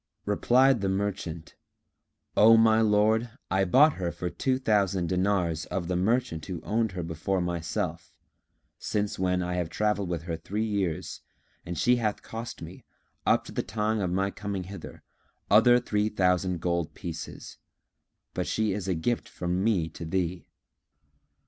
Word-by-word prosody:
Replied 125 +4 +3
the 100 - 0
merchant, 95 -4 -3 0.8
"O 115 +2 +7
my 110 0 +5
lord, 110 +2 +3 0.2
I 95 +1 +3
bought 140 - +5
her 85 -1 -1
for 90 0 -4
two 130 -1 0
thousand 100 -8 +1
dinars 90 -4 0
of 90 -3 -3
the 90 - -1
merchant 95 -4 0
who 90 -3 -4
owned 110 -1 0
her 90 -1 -4
before 85 +4 -2
myself, 85 0 -3 0.7
since 105 -2 -2
when 90 -1 +1
I 90 0 -2
have 90 -2 -2
travelled 105 0 0
with 85 -2 -3
her 85 -1 -3
three 105 +7 -3
years 95 -5 -2 0.5
and 90 - -4
she 125 0 +3
hath 110 -3 -2
cost 115 +1 -7
me, - - -10 0.4
up - - +3
to - - -9
the - - -1
time 110 +1 -1
of 95 -3 0
my 95 +2 0
coming 100 -2 -4
hither, 100 +2 -10 0.5
other 120 +4 +7
three 105 -3 0
thousand 90 -3 +1
gold 85 -2 -1
pieces; 85 -4 -7 0.7
but - - -2
she 110 -2 0
is 100 -1 -4
a 95 - +1
gift 115 +9 -1
from 90 +2 -2
me 100 -7 +2
to - - -9
thee." 90 +1 -2
95 Hz, 160 wpm, -27 LUFS, 90-110 Hz, 0.8 s, O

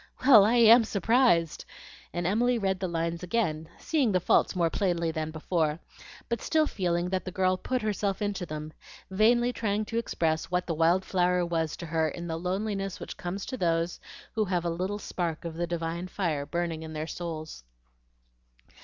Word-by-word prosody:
Well, 235 -7 +9
I 225 +3 +3
AM 235 0 +8
surprised!" 215 -5 +2 0.5
and 175 0 -3
Emily 235 +6 +2
read 190 -3 0
the 185 - -2
lines 170 0 -2
again, 170 -5 -1
seeing 285 -9 +1
the 185 - +2
faults 175 - +2
more 170 -2 +1
plainly 170 -4 0
than 155 -1 -3
before, 155 -1 -1 0.5
but 235 - -2
still 315 -1 +2
feeling 175 - -1
that 190 0 -1
the 185 - -6
girl 185 0 +2
put 255 +6 -2
herself 205 -2 -1
into 205 -3 -2
them, 155 0 -6 0.4
vainly 240 +5 +3
trying 215 -2 -1
to 230 +2 -2
express 160 -8 -1
what 180 0 0
the 170 - -2
wild 170 +4 +2
flower 180 -1 +1
was 165 -2 -2
to - - -7
her 160 -1 0
in 170 +2 -7
the 165 -1 -3
loneliness 195 +2 -3
which - - -7
comes 185 +3 -5
to 255 - -5
those 170 -3 0 0.3
who 215 -1 +1
have 180 -3 -1
a 170 - 0
little 185 +4 -2
spark 170 -5 -4
of 165 - -4
the 170 +1 -2
divine 170 +1 -3
fire 160 -7 -2
burning 170 -2 -2
in 160 0 -7
their 155 0 -3
souls. 160 - -6
180 Hz, 185 wpm, -28 LUFS, 165-205 Hz, 0.5 s, Well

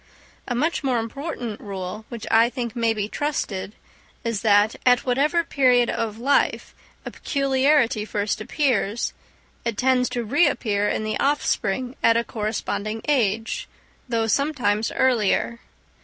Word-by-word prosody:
A 245 - -2
much 315 +5 0
more 260 -3 +1
important 235 -1 -4
rule, 195 +1 -6
which 235 -3 -7
I 225 +1 +5
think 240 -2 -5
may 230 -1 +2
be 210 -2 -2
trusted, 215 -8 -3 0.5
is 230 -3 -2
that, 205 0 +4
at 245 -1 +4
whatever 290 +7 +2
period 250 -6 +3
of 220 -2 -3
life 275 +5 +1 0.3
a - - -5
peculiarity 275 -5 +1
first 210 0 -2
appears, 235 -4 0 0.5
it 235 -3 -2
tends 255 -1 +2
to 240 - -2
reappear 215 -6 +1
in - - -1
the 215 0 -2
offspring 260 -4 0
at 230 0 +4
a 235 - +1
corresponding 215 -1 -3
age, 225 -6 0 0.4
though 230 -2 +1
sometimes 235 -4 0
earlier. 235 -2 +1
235 Hz, 135 wpm, -23 LUFS, 215-260 Hz, 0.5 s, I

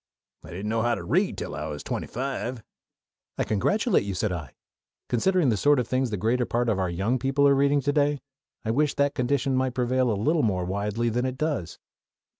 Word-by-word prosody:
I - - -12
didn't 95 +5 -5
know 115 0 +1
how 120 +1 +2
to 100 - -6
read - - +1
till - - -5
I - - -4
was 75 -1 -6
twenty - - -3
five." 130 -2 -4 0.7
"I - - +1
congratulate 205 - +1
you," 100 -1 -4
said 105 +2 -1
I. 80 -7 -6 0.5
"Considering 175 +5 +2
the 110 - +1
sort 145 +7 +4
of 125 - 0
things 130 0 0
the 105 - -2
greater 120 +5 +1
part 120 0 0
of 105 -3 +1
our 95 -1 0
young 100 +9 0
people 135 +3 +2
are 140 - +5
reading 140 +1 +3
to 145 +2 0
day, 145 -1 +2 0.5
I 110 - +1
wish 150 +5 +1
that 140 0 +2
condition 130 +1 0
might 130 -1 0
prevail 125 0 +1
a - - +2
little 155 +10 +2
more 95 -6 0
widely 105 +5 -1
than 125 +3 0
it 130 0 -4
does." 145 - -2
125 Hz, 220 wpm, -26 LUFS, 105-140 Hz, 0.7 s, are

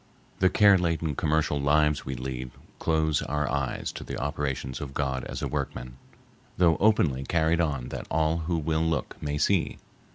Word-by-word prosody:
The 95 - +5
care 100 -1 +6
laden 85 -3 0
commercial 75 -1 +1
lives 75 +1 +2
we 65 - -3
lead 65 0 -5 0.3
close 80 -2 +1
our 75 0 -1
eyes 70 -2 -2
to - - -8
the - - -5
operations 65 -2 -3
of 70 -2 -7
God 65 -3 -1
as - - -5
a - - 0
workman, 60 +1 -4 0.6
though 85 -2 +4
openly 85 -11 +3
carried 80 +3 +2
on 70 -7 -1
that - - -6
all 80 +1 +1
who 85 +1 -1
will 80 0 0
look 80 -1 -1
may 75 0 -2
see. 85 +4 +1
75 Hz, 170 wpm, -27 LUFS, 70-80 Hz, 0.6 s, care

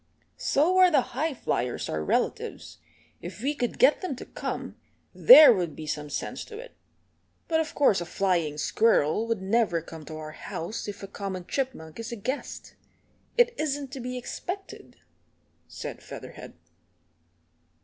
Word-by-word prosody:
"So 350 +7 +2
are 370 -1 +8
the 290 -8 +1
High 295 +3 -1
Flyers 125 - -2
our 80 0 -2
relatives. - - -2 0.4
If 185 +4 -8
we 285 +2 +1
could 245 -5 -3
get 270 +4 +5
them 360 -8 -3
to - - -9
come - - -5 0.4
there 310 - +10
would 175 -6 -2
be 155 - -7
some 150 -1 -4
sense - - -4
to 440 - -10
it. - - -11 0.7
But 320 -1 +2
of 320 -1 -3
course 210 -10 +4
a - - -3
flying 175 -6 0
squirrel 215 +2 +2
would 225 -4 -2
never 195 -4 +2
come 160 -1 -10
to 155 - -8
our 155 0 -7
house 170 +7 -6
if 205 0 -7
a - - -5
common 190 -2 -5
chipmunk 230 - -4
is 230 +1 -5
a - - -3
guest. 255 +6 -5 0.6
It 485 0 +5
isn't 285 -3 -2
to 270 - -6
be 250 +1 -4
expected," 350 - -7 0.7
said - - -7
Featherhead. - - -10
230 Hz, 160 wpm, -27 LUFS, -, 0.7 s, there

